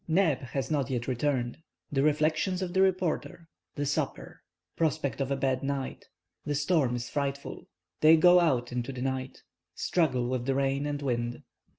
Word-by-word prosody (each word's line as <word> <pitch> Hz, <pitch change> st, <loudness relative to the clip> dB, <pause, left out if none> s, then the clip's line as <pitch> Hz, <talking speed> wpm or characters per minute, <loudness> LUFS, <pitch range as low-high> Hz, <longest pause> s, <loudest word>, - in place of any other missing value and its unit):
NEB 165 Hz, -4 st, +3 dB
HAS 130 Hz, 0 st, -4 dB
NOT 140 Hz, -5 st, 0 dB
YET 125 Hz, -2 st, -2 dB
RETURNED—THE 135 Hz, +2 st, -2 dB
REFLECTIONS 155 Hz, +5 st, +1 dB
OF 175 Hz, -1 st, -4 dB
THE 190 Hz, -, +3 dB
REPORTER—THE 165 Hz, -5 st, -2 dB
SUPPER—PROSPECT 140 Hz, -, -3 dB
OF 135 Hz, -, -1 dB
A 140 Hz, -, +1 dB
BAD 130 Hz, -1 st, 0 dB
NIGHT—THE 135 Hz, -, -5 dB
STORM 145 Hz, -4 st, +2 dB
IS 120 Hz, 0 st, -4 dB
FRIGHTFUL—THEY 145 Hz, +2 st, 0 dB
GO 180 Hz, +2 st, +7 dB
OUT 130 Hz, -8 st, +1 dB
INTO 125 Hz, +2 st, -3 dB
THE 125 Hz, 0 st, -4 dB
NIGHT—STRUGGLE 130 Hz, +1 st, -2 dB
WITH 125 Hz, -1 st, -2 dB
THE 135 Hz, -, +1 dB
RAIN 140 Hz, +1 st, 0 dB
AND 145 Hz, 0 st, -3 dB
WIND. 120 Hz, -2 st, -2 dB
140 Hz, 140 wpm, -29 LUFS, 125-155 Hz, -, GO